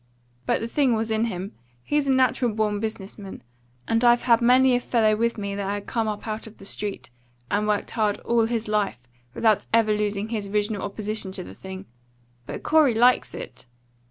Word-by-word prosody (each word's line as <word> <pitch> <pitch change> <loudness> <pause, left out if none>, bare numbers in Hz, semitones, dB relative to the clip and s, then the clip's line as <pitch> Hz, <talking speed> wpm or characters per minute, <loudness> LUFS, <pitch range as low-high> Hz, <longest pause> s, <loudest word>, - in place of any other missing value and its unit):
But - - +1
the 225 - -2
thing 260 -1 +2
was 220 0 -2
in 220 +1 +1
him. 190 -2 -4 0.3
He's 295 -1 0
a - - +3
natural 255 -2 +2
born 210 -1 0
business 215 -2 -5
man; 195 -9 -9 0.4
and 225 +1 +1
I've 240 0 +5
had 235 -2 +4
many 255 +2 +5
a - - +2
fellow 225 -3 +2
with 235 +2 0
me 200 -1 -3
that 200 -1 -3
had 205 0 -3
come 225 -2 -1
up 210 +1 -4
out 215 +1 -4
of 220 - -14
the - - -12
street, 200 -7 -4 0.4
and 210 +1 +1
worked 210 -1 0
hard 215 -3 0
all 235 -1 +2
his 230 -2 -2
life, 210 - 0 0.4
without 220 -3 +2
ever 225 -1 +4
losing 210 0 -2
his 215 -3 -3
original 205 0 -1
opposition 210 -1 -4
to 185 - -4
the - - -10
thing. 190 0 -9 0.6
But - - -6
Corey 300 -6 +4
likes 245 +2 +3
it. - - -9
220 Hz, 200 wpm, -24 LUFS, 205-235 Hz, 0.6 s, I've